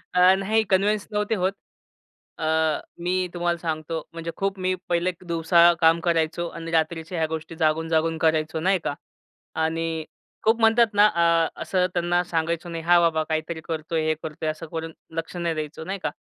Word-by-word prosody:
अ, -, -, +4 dB, 0.2 s
नाही 220 Hz, +3 st, +2 dB
कन्व्हेन्स 200 Hz, +2 st, +2 dB
नव्हते 210 Hz, +1 st, 0 dB
होत. 190 Hz, 0 st, 0 dB, 0.9 s
अ, 160 Hz, -, -2 dB, 0.6 s
मी 185 Hz, +1 st, 0 dB
तुम्हाला 175 Hz, -1 st, 0 dB
सांगतो, 160 Hz, -1 st, -3 dB
म्हणजे 165 Hz, 0 st, -5 dB
खूप 195 Hz, 0 st, -2 dB
मी 185 Hz, 0 st, +1 dB, 0.2 s
पहिले 175 Hz, +1 st, +1 dB
एक 180 Hz, 0 st, -9 dB
दिवसा 170 Hz, +1 st, +5 dB
काम 165 Hz, +1 st, +5 dB
करायचो 170 Hz, 0 st, +1 dB
आणि 165 Hz, 0 st, -7 dB
रात्रीच्या 160 Hz, +1 st, -1 dB
ह्या 160 Hz, -1 st, +1 dB
गोष्टी 160 Hz, +1 st, -6 dB
जागून-जागून 160 Hz, 0 st, +1 dB
करायचो 160 Hz, 0 st, +1 dB
नाही 185 Hz, +3 st, +2 dB
का? -, -, -1 dB, 0.7 s
आणि 165 Hz, 0 st, -2 dB, 0.4 s
खूप 225 Hz, +1 st, +3 dB
म्हणतात 225 Hz, +1 st, +5 dB
ना, 205 Hz, +1 st, +6 dB
अ, 170 Hz, -3 st, +3 dB
असं 185 Hz, -1 st, +1 dB
त्यांना 175 Hz, 0 st, +1 dB
सांगायचं 170 Hz, 0 st, -2 dB
नाही, 165 Hz, -1 st, -5 dB
हां 175 Hz, +1 st, +5 dB
बाबा, 160 Hz, -2 st, +2 dB
काहीतरी 160 Hz, +1 st, -2 dB
करतो 160 Hz, 0 st, -4 dB
आहे, 160 Hz, -1 st, +1 dB
हे 155 Hz, -, +3 dB
करतो 155 Hz, 0 st, -6 dB
आहे, 155 Hz, -, +2 dB
असं 160 Hz, +1 st, -9 dB
करून 165 Hz, 0 st, -4 dB, 0.3 s
लक्ष 165 Hz, +2 st, -4 dB
नाही 170 Hz, -2 st, -1 dB
द्यायचं, 155 Hz, +1 st, -5 dB
नाही 195 Hz, +1 st, -3 dB
का. -, -, +1 dB
165 Hz, 180 wpm, -24 LUFS, 160-180 Hz, 0.9 s, ना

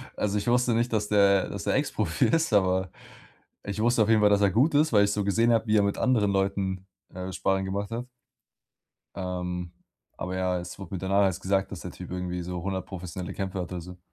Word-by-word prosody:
Also, 105 Hz, 0 st, -1 dB
ich 100 Hz, -, -3 dB
wusste 125 Hz, 0 st, +3 dB
nicht, 120 Hz, 0 st, 0 dB
dass 105 Hz, -1 st, 0 dB
der 100 Hz, -2 st, +4 dB
dass -, -, -5 dB
der -, -, 0 dB
Ex -, -, 0 dB
Profi -, -, 0 dB
ist, 165 Hz, -6 st, +1 dB
aber 95 Hz, -2 st, +2 dB, 0.7 s
ich 105 Hz, +1 st, -4 dB
wusste 120 Hz, -1 st, +3 dB
auf 105 Hz, -, -1 dB
jeden 110 Hz, -1 st, +5 dB
Fall, 105 Hz, -, +6 dB
dass 100 Hz, 0 st, +3 dB
er 100 Hz, -1 st, +4 dB
gut 140 Hz, -, +3 dB
ist, 150 Hz, -3 st, +3 dB
weil 100 Hz, -1 st, +6 dB
ich 100 Hz, -, 0 dB
so 105 Hz, 0 st, -1 dB
gesehen 115 Hz, +4 st, +2 dB
habe, 115 Hz, -1 st, +2 dB
wie 105 Hz, 0 st, +3 dB
er 105 Hz, -, +5 dB
mit 100 Hz, 0 st, 0 dB
anderen 110 Hz, -6 st, +2 dB
Leuten 95 Hz, -1 st, -1 dB, 0.5 s
Sparring 95 Hz, +1 st, 0 dB
gemacht 100 Hz, +1 st, -3 dB
hat. 120 Hz, +2 st, -4 dB, 1.1 s
Ähm, 90 Hz, -2 st, -4 dB, 0.5 s
aber 90 Hz, 0 st, -4 dB
ja, 90 Hz, -1 st, 0 dB
es 90 Hz, 0 st, -8 dB
wurde 95 Hz, -1 st, -9 dB
mir 90 Hz, -, -4 dB
danach 100 Hz, +1 st, +2 dB
erst 95 Hz, -1 st, 0 dB
gesagt, 95 Hz, 0 st, 0 dB
dass 100 Hz, -, -6 dB
der 90 Hz, -, -7 dB
Typ 90 Hz, 0 st, -10 dB
irgendwie 90 Hz, -1 st, -3 dB
so 90 Hz, 0 st, -5 dB
100 95 Hz, 0 st, -3 dB
professionelle 90 Hz, -1 st, -6 dB
Kämpfe 95 Hz, -1 st, -4 dB
hat, 90 Hz, 0 st, -5 dB
oder 90 Hz, -1 st, -4 dB
so. 90 Hz, +1 st, -11 dB
100 Hz, 230 wpm, -27 LUFS, 90-105 Hz, 1.1 s, Fall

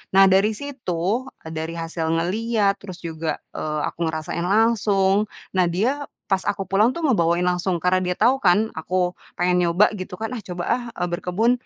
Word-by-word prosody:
nah 195 Hz, -, +8 dB
dari 205 Hz, +3 st, +3 dB
situ, 235 Hz, -4 st, -2 dB, 0.2 s
eee, 160 Hz, -, -8 dB
dari 160 Hz, +1 st, -4 dB
hasil 165 Hz, 0 st, -3 dB
ngelihat 200 Hz, +6 st, +1 dB
terus 185 Hz, -2 st, -10 dB
juga, 160 Hz, -1 st, -3 dB, 0.2 s
eee, 150 Hz, 0 st, -3 dB
aku -, -, -8 dB
ngerasain 160 Hz, +2 st, -3 dB
langsung 205 Hz, -1 st, +3 dB, 0.2 s
nah 185 Hz, -2 st, +2 dB
dia 245 Hz, +12 st, 0 dB, 0.2 s
pas 190 Hz, -1 st, +1 dB
aku 195 Hz, -, 0 dB
pulang 210 Hz, +6 st, +2 dB
tuh 335 Hz, -, -4 dB
ngebawain 175 Hz, -, +2 dB
langsung 180 Hz, +1 st, +1 dB
karena 185 Hz, +1 st, +3 dB
dia 180 Hz, -1 st, -1 dB
tau 250 Hz, +7 st, +3 dB
kan 205 Hz, +3 st, +3 dB
aku 170 Hz, +3 st, -4 dB, 0.4 s
pengen 180 Hz, 0 st, +2 dB
nyoba 180 Hz, +5 st, +4 dB
gitu 185 Hz, 0 st, -6 dB
kan, 220 Hz, +5 st, -4 dB
"Ah, 250 Hz, -, -4 dB
coba, 175 Hz, -1 st, -4 dB
ah," 245 Hz, -, -5 dB
eee, 175 Hz, -, -1 dB
"berkebun," 180 Hz, +7 st, +1 dB
185 Hz, 180 wpm, -23 LUFS, 170-215 Hz, 0.4 s, nah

